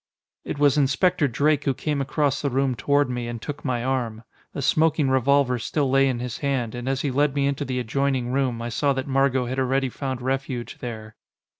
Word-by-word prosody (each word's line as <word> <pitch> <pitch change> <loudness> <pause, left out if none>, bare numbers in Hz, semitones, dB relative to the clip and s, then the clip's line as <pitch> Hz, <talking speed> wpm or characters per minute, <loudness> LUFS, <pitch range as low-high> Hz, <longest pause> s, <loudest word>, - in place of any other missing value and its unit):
It - - -5
was 145 0 +4
Inspector 150 +3 +2
Drake 145 +4 +1
who 135 -3 +1
came 150 -2 -2
across 140 0 0
the 140 - 0
room 135 0 +1
toward 145 +3 +2
me, 125 -1 -3
and 120 -1 -5
took 145 +5 -6
my 125 -3 -1
arm. 120 -4 -2 0.3
The 140 - -5
smoking 155 -2 +2
revolver 130 -1 +3
still 135 +3 -1
lay 135 0 +4
in 130 -2 0
his 120 -1 -5
hand, 130 -6 -1
and 120 +1 -4
as 135 0 0
he 140 - -1
led 145 +1 +1
me 140 -1 +1
into 140 +1 -1
the 130 -1 -3
adjoining 130 +1 -1
room, 130 -3 0
I 120 - -3
saw 140 +4 +1
that 130 0 -3
Margot 135 -1 +2
had 130 +2 -3
already 130 0 +1
found 130 0 -4
refuge 130 -2 -3
there. 110 -3 -7
135 Hz, 210 wpm, -24 LUFS, 125-140 Hz, 0.3 s, was